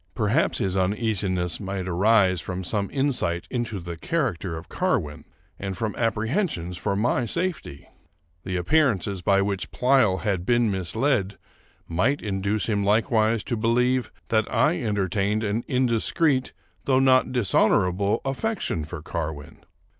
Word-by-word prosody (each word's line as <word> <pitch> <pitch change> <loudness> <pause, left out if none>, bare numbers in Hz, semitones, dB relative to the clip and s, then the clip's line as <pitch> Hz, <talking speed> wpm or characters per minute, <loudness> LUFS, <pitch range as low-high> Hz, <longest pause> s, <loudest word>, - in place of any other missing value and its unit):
Perhaps 110 +10 +1
his 95 -1 -1
uneasiness 95 -2 0
might 95 -2 -4
arise 95 -1 +3
from 95 +1 -5
some 100 +2 -2
insight 130 -12 -1
into 120 -5 -2
the 85 -1 -6
character 100 - -2
of 80 - -10
Carwin, 75 0 -2 0.3
and 95 -2 -4
from 110 +1 -2
apprehensions 115 - -1
for 100 - -2
my 120 +4 +1
safety. 145 - -3 0.6
The 95 -1 -4
appearances 100 - +1
by 100 +2 +3
which 100 -2 -2
Pleyel 125 -7 +2
had 100 -5 -1
been 120 +1 +2
misled 100 - 0 0.5
might 115 +13 0
induce 100 +1 -1
him 105 -3 0
likewise 110 +1 +2
to 120 - -2
believe 125 +3 +1 0.2
that 110 -1 +1
I 155 +3 +2
entertained 105 -1 0
an 110 +2 -1
indiscreet 130 +2 +1 0.3
though 130 -1 +3
not 130 -1 +4
dishonorable 100 -3 +2
affection 135 - -2
for 80 0 -8
Carwin. 80 -3 -5
105 Hz, 130 wpm, -24 LUFS, 95-125 Hz, 0.6 s, not